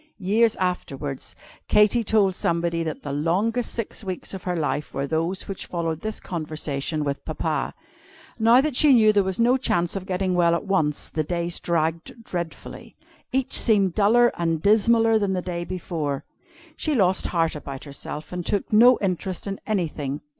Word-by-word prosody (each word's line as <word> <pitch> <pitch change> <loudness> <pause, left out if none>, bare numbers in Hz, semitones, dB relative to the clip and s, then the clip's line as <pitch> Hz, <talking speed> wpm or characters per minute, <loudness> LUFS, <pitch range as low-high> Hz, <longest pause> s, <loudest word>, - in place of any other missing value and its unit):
Years 215 +4 +2
afterwards, 145 -7 -4 0.3
Katy 210 +3 +4
told 205 -3 +2
somebody 170 -1 0
that 160 -2 -4
the 145 - -4
longest 195 - 0
six 230 -1 -4
weeks 185 -1 -5
of 190 - -8
her 180 -1 -1
life 150 -2 -2
were 135 - -1
those 165 +5 -2
which 195 - -6
followed 165 -2 -3
this 215 0 -4
conversation 155 -2 -3
with 140 -1 -3
Papa. - - -2 0.6
Now 230 +3 +6
that 295 -2 -2
she 295 +1 +6
knew 215 -3 +5
there 200 -1 +3
was 190 +1 -3
no 245 +3 +4
chance 175 -9 0
of 190 -1 -5
getting 185 -1 -1
well 170 -1 +3
at - - -4
once, 155 -7 0
the 155 - -1
days 170 +1 -2
dragged 165 +6 -2
dreadfully. 175 -5 -7 0.4
Each 265 0 -1
seemed 200 -6 +4
duller 235 +4 +4
and 165 -2 0
dismaller 225 +2 +4
than 200 -2 0
the 185 - -1
day 175 -1 -4
before. 160 -6 -4 0.5
She 310 -2 0
lost 190 -5 +2
heart 165 -2 0
about 140 -2 -7
herself, 150 +3 -8
and 180 0 -3
took 205 +4 -2
no 240 +3 +7
interest 185 -1 -2
in 195 -1 -4
anything. 155 -9 -2
180 Hz, 170 wpm, -24 LUFS, 160-215 Hz, 0.6 s, no